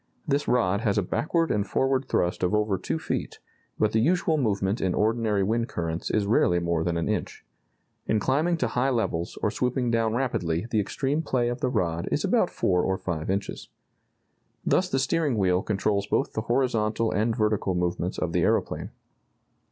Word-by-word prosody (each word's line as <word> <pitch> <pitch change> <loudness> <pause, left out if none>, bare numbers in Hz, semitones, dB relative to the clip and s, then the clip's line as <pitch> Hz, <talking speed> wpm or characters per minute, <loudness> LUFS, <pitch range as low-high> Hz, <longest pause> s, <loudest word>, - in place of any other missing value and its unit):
This 145 0 0
rod 105 -5 +2
has 105 -4 +1
a 105 - +2
backward 165 - 0
and 105 - +1
forward 130 +6 0
thrust 90 -7 0
of 90 +3 +1
over 105 -3 +1
two - - -2
feet, - - -4 0.4
but 110 -1 +2
the 110 - +2
usual 165 +5 +2
movement 105 -6 0
in 90 -2 0
ordinary 110 -2 +1
wind 115 +4 0
currents 85 -1 -3
is 105 -2 +1
rarely 95 -4 +3
more 85 -1 0
than 85 0 -1
an 85 - -1
inch. 105 -3 -3 0.6
In 110 - +2
climbing 155 +10 +1
to 125 -7 0
high 125 +3 +1
levels 110 -9 -1
or 105 - +2
swooping 125 0 0
down 115 -1 +1
rapidly 90 -9 -1
the 110 - +2
extreme 135 +8 -1
play 125 -6 0
of 120 - -4
the 130 - +1
rod 85 -8 -1
is - - 0
about - - +2
four 90 0 +1
or 95 0 0
five 80 -4 -4
inches. 100 +1 -3 1.0
Thus 185 0 +2
the 135 - 0
steering 140 -1 +1
wheel 90 -2 +2
controls 100 0 0
both - - 0
the 110 - -1
horizontal 115 -2 0
and 110 +2 +1
vertical 105 -4 0
movements 90 -1 -1
of - - -2
the - - +2
aeroplane. - - 0
110 Hz, 185 wpm, -26 LUFS, 95-125 Hz, 1.0 s, rarely